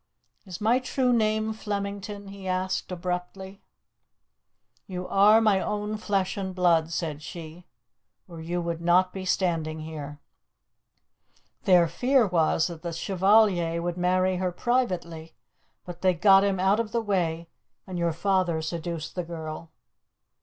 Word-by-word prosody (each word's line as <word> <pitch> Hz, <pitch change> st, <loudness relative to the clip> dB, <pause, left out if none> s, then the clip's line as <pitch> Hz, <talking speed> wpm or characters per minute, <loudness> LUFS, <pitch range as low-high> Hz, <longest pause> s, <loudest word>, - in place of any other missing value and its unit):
"Is 180 Hz, -2 st, -7 dB
my 230 Hz, +4 st, +3 dB
true 255 Hz, -1 st, 0 dB
name 220 Hz, -1 st, +1 dB
Flemington?" 200 Hz, -1 st, -5 dB
he 195 Hz, -1 st, -9 dB
asked 185 Hz, 0 st, -2 dB
abruptly. 180 Hz, +2 st, -5 dB, 1.3 s
"You 185 Hz, -2 st, -5 dB
are 210 Hz, +3 st, +6 dB
my 210 Hz, -3 st, +3 dB
own 210 Hz, +1 st, -3 dB
flesh 195 Hz, -3 st, -1 dB
and 190 Hz, -2 st, -4 dB
blood," 170 Hz, -3 st, +2 dB
said 155 Hz, -3 st, -3 dB
she, 165 Hz, +2 st, -10 dB, 0.6 s
"or 170 Hz, -3 st, -10 dB
you 175 Hz, +2 st, -3 dB
would 170 Hz, -1 st, -4 dB
not 180 Hz, +2 st, +3 dB
be 190 Hz, -1 st, -6 dB
standing 165 Hz, -4 st, -1 dB
here. 150 Hz, -2 st, -7 dB, 1.5 s
Their 180 Hz, -4 st, +5 dB
fear 250 Hz, -, +2 dB
was 165 Hz, -3 st, +2 dB
that 170 Hz, -3 st, -6 dB
the 170 Hz, -1 st, -5 dB
Chevalier 190 Hz, -2 st, +2 dB
would 175 Hz, 0 st, -3 dB
marry 185 Hz, +1 st, +1 dB
her 185 Hz, 0 st, -1 dB
privately, 175 Hz, -8 st, -2 dB, 0.5 s
but 175 Hz, -1 st, -9 dB
they 185 Hz, -1 st, +3 dB
got 195 Hz, +3 st, +6 dB
him 195 Hz, -2 st, 0 dB
out 195 Hz, +3 st, +3 dB
of 220 Hz, -2 st, -3 dB
the 235 Hz, -, +1 dB
way, 170 Hz, -6 st, -1 dB, 0.4 s
and 185 Hz, -2 st, -5 dB
your 170 Hz, -1 st, +1 dB
father 180 Hz, -1 st, 0 dB
seduced 165 Hz, 0 st, -4 dB
the 180 Hz, -, -3 dB
girl. 160 Hz, -1 st, -7 dB
185 Hz, 140 wpm, -26 LUFS, 170-200 Hz, 1.5 s, are